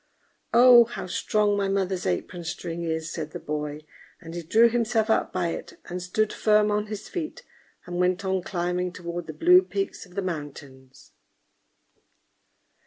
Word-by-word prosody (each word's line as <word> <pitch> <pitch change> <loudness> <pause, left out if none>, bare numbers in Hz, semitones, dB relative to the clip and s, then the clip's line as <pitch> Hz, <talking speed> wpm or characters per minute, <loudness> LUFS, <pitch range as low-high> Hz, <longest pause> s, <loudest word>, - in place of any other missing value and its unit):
"Oh! 240 0 +8
how 235 -3 -6
strong 205 +3 +1
my 200 -1 0
mother's 190 -2 -1
apron 170 - -3
string 165 0 -5
is!" 160 -1 -3
said 155 -2 -5
the - - -5
boy: 150 0 -4 0.4
and 165 -2 -10
he 175 - -4
drew 220 +8 +5
himself 230 -1 +1
up - - +1
by 180 -2 -1
it, - - -7
and 180 +1 -4
stood 210 +4 0
firm 210 -1 +3
on 210 0 0
his 210 0 -6
feet, 355 +7 -5 0.4
and 175 0 -5
went 180 +2 +1
on 190 -1 0
climbing 180 0 -2
toward 170 -2 -6
the 155 - -6
blue 180 +4 +6
peaks 195 +1 -4
of 180 - -19
the 200 - -2
mountains. 140 -6 -8
180 Hz, 165 wpm, -26 LUFS, 165-210 Hz, 0.4 s, Oh